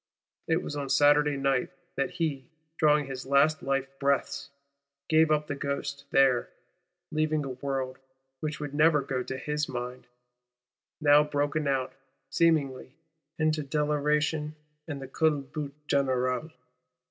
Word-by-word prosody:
It 165 +2 +1
was 150 - -5
on 140 -2 -4
Saturday 145 +1 +4
night 135 -2 +1 0.3
that 135 - 0
he, 150 -6 -3 0.3
drawing 150 -1 +4
his 135 -1 -6
last 140 +2 +3
life 135 0 0
breaths, 140 0 0 0.6
gave 160 0 +5
up 150 -1 +2
the 145 - -3
ghost 140 0 -4
there;—leaving 150 +3 0
a - - -4
world, 130 0 -3 0.4
which 155 +1 -4
would 145 -2 -5
never 150 -1 +4
go 135 -2 -2
to 130 +1 -5
his 150 +2 -2
mind, 125 0 -5 0.9
now 145 0 +6
broken 145 0 -1
out, 135 -2 0 0.4
seemingly, 140 -5 +1 0.4
into 155 -1 +1
deliration 150 +1 0 0.3
and 145 -3 -5
the 135 - -7
culbute 145 -1 -1
générale. 130 +1 0
145 Hz, 125 wpm, -28 LUFS, 135-150 Hz, 0.9 s, now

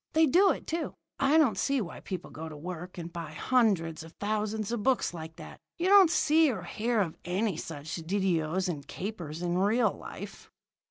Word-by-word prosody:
They 320 +1 +5
do 365 +7 +5
it, - - -1
too. 330 0 -3 0.2
I 275 +3 +4
don't 255 -12 +4
see 275 -1 +1
why 190 -7 -5
people 185 -2 -6
go 160 +1 -7
to 155 - -9
work 180 +3 -7
and 170 0 -6
buy 165 -3 -6
hundreds 185 -8 +1
of 160 +1 -11
thousands 215 +1 -2
of 235 -3 -1
books 255 -4 +1
like 160 -1 -8
that. - - -11 0.2
You 355 +2 +1
don't 395 -4 +8
see 315 -1 +4
or 190 -7 -5
hear 220 +5 0
of 165 -5 -2
any 190 +2 0
such 155 -1 -6
didoes 180 0 0
and 150 -6 -4
capers 175 -5 -5
in 175 +1 0
real 215 +5 +3
life." - - -9
190 Hz, 195 wpm, -29 LUFS, 165-245 Hz, 0.2 s, don't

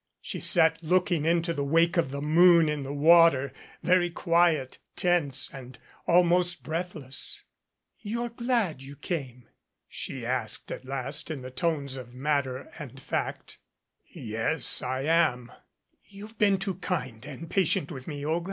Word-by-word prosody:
She - - -5
sat 160 0 +4
looking 175 -1 +1
into 170 0 +1
the 145 -3 -2
wake 165 +5 +2
of 170 -6 +1
the 140 +1 -5
moon 170 +1 +6
in 150 -1 -2
the 135 0 -5
water, 145 -3 +5 0.3
very 175 -1 +3
quiet, 170 -5 +1 0.2
tense 150 -7 +1
and 130 -2 -10 0.3
almost 175 +1 +3
breathless. 160 -5 -5 0.6
"You're 235 +3 -3
glad 235 - -1
you 135 +1 -10
came?" 130 -7 -5 0.4
she - - -5
asked - - -3
at - - -7
last 135 +3 -1
in 145 -5 -5
the 130 - -8
tones 140 -2 -2
of 125 -1 -10
matter 135 -2 -2
and - - -9
fact. - - -4 0.5
"Yes, 115 +6 -2
I 130 +1 -3
am. 140 -7 +1 0.5
You've 210 +3 -13
been 200 -2 +4
too 190 -2 -4
kind 130 -12 -4
and 145 +3 -8
patient 170 -4 +1
with 130 -4 -8
me, 145 -2 -5
Olga." 160 +3 +1
155 Hz, 145 wpm, -27 LUFS, 135-175 Hz, 0.6 s, moon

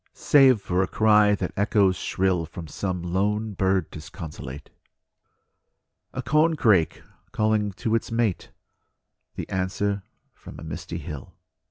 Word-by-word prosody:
Save 135 -6 +5
for 90 -1 0
a 95 - +1
cry 105 -1 +4
that - - -4
echoes 100 -2 +3
shrill 90 -4 0
From 85 0 -8
some 90 +2 -3
lone 105 +4 -1
bird 95 -2 0
disconsolate; 75 -4 -9 1.4
A 130 - -5
corncrake 140 - +2 0.3
calling 110 -2 +1
to 110 +4 -2
its 115 - 0
mate; 115 -5 0 0.9
The - - -5
answer 100 +2 -1 0.3
from - - -13
the - - -10
misty 85 - -6
hill. 75 -4 -8
100 Hz, 125 wpm, -25 LUFS, 90-110 Hz, 1.4 s, Save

